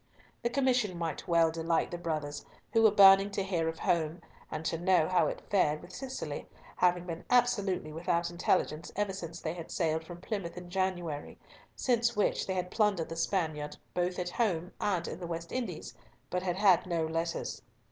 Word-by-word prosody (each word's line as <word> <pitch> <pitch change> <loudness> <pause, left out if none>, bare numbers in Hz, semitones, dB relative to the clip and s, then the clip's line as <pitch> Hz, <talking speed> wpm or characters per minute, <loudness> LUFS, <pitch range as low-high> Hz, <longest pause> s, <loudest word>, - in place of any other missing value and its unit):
The 235 - 0
commission 250 -8 +1
might 165 -3 -3
well 165 -1 +4
delight 165 0 0
the 175 - -3
brothers, 155 -4 -3 0.3
who 225 - +5
were 220 - +8
burning 195 -1 +7
to 195 - 0
hear 175 -4 0
of 165 - -5
home, 165 -1 0 0.3
and 155 +1 -5
to 165 - -1
know 175 -3 +3
how 185 -1 +3
it - - -4
fared 155 -7 +3
with 175 +2 -13
Cicely, 265 +4 -5 0.3
having 180 -1 +3
been 170 -1 -5
absolutely 210 -10 +2
without 170 +1 0
intelligence 170 -2 0
ever 205 -1 0
since 170 -3 -6
they 160 - -2
had 170 -2 -8
sailed 160 -2 0
from 175 +1 -9
Plymouth 185 -3 -4
in 175 0 -8
January, 175 -5 -2 0.4
since 235 -1 +1
which 210 - +1
they 190 - -1
had 180 0 -2
plundered 205 -7 +1
the 165 - -5
Spaniard 160 -4 -1 0.2
both 180 0 0
at 180 -1 -2
home 180 -7 0
and 185 -4 0
in 160 - -5
the 175 - -5
West 165 0 -5
Indies, 255 -2 -4 0.4
but 180 - 0
had 180 -1 -1
had 190 -3 +4
no 170 -2 0
letters. 165 +1 -3
175 Hz, 190 wpm, -31 LUFS, 165-195 Hz, 0.4 s, were